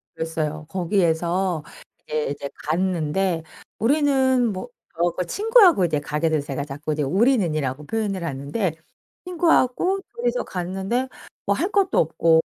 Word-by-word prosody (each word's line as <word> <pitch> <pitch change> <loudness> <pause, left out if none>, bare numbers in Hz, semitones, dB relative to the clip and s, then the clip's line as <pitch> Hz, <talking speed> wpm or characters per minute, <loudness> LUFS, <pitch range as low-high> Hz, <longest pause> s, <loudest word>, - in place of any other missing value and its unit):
그랬어요. 155 -1 -3
거기에서 175 -1 0 0.4
이제 155 0 -1
이제 140 -1 -5 0.2
갔는데 170 0 0 0.4
우리는 260 -2 +3
뭐 190 +6 -5 0.3
저하고 175 +2 0
친구하고 405 - +5
이제 155 -3 0
가게 150 +2 -1
돼서 150 -2 0
제가 140 0 -3
자꾸 150 +2 -4
이제 150 -1 -1
우리는이라고 155 - +1
표현을 200 -2 -2
하는데 150 +6 -2 0.5
친구하고 355 +1 +2 0.2
2 240 +1 -2
이서 245 +1 0
갔는데 190 +8 -2 0.4
뭐 - - +2
할 370 +4 -1
것도 395 -2 +2
없고 160 +1 +3
180 Hz, 310 characters per minute, -23 LUFS, 155-245 Hz, 0.5 s, 친구하고